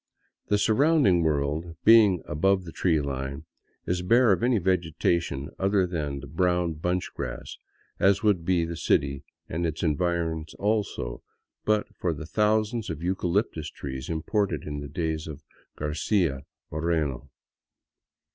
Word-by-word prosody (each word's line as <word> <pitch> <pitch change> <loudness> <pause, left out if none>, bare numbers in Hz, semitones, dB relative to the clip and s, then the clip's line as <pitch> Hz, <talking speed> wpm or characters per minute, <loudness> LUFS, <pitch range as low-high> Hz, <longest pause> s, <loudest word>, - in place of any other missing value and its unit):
The 105 - +3
surrounding 110 - +4
world, 80 +2 -1
being 105 -5 +6
above 95 +5 +1
the 80 - -8
tree 80 -1 +1
line, 70 +1 -4 0.4
is 90 0 -1
bare 115 +5 +4
of 95 - +2
any 120 0 +3
vegetation 85 -5 0
other 95 0 +2
than 75 -6 -3
the - - -8
brown 90 +2 +1
bunch 90 +4 -2
grass; - - -5 0.4
as 100 +2 +3
would 100 -6 +3
be 85 -1 +2
the 85 +1 -5
city 70 -3 +1 0.2
and 85 +2 -3
its 80 -2 -2
environs, 80 0 -1
also, 105 - -1 0.4
but 105 -1 +2
for 85 -3 -1
the 75 - -7
thousands 110 +4 +1
of 80 -1 -5
eucalyptus 90 -3 -1
trees 65 -2 -7
imported 85 0 -1
in 75 -1 -5
the 70 - -6
days 80 0 -2
of 75 -1 -8 0.3
Garcia 75 -1 0 0.3
Moreno. 80 -4 -1
85 Hz, 135 wpm, -26 LUFS, 75-95 Hz, 0.4 s, being